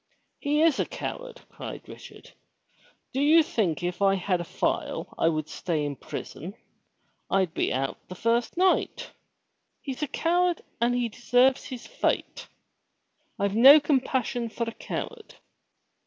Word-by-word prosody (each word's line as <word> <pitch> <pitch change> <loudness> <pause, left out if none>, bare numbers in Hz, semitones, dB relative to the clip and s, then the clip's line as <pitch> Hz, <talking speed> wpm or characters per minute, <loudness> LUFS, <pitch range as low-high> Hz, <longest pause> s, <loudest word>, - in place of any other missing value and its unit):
"He 295 +2 +1
is 325 -5 +3
a - - +2
coward," - - -6
cried - - -8
Richard. - - -12 0.8
"Do 270 - 0
you 315 +3 +6
think 185 - -1
if 175 +1 -3
I 195 -1 +4
had 185 -1 0
a - - -3
file, - - -2
I 165 - +2
would 155 -2 -2
stay 155 -3 -2
in 145 -1 -3
prison? 175 +7 -7 0.7
I'd 190 -4 +1
be - - 0
out 135 +1 -2
the 185 - -8
first 230 - 0
night. 370 +1 +1 0.7
He's 270 -1 -6
a 300 - 0
coward 350 +4 +1 0.2
and 240 +1 +2 0.2
deserves 250 +3 +3
his 255 -3 -7
fate. - - -2 0.9
I've 200 0 0
no 270 +6 +9
compassion 260 -4 0
for 235 - -3
a 230 - -4
coward." 445 - -6
240 Hz, 140 wpm, -27 LUFS, 185-290 Hz, 0.9 s, no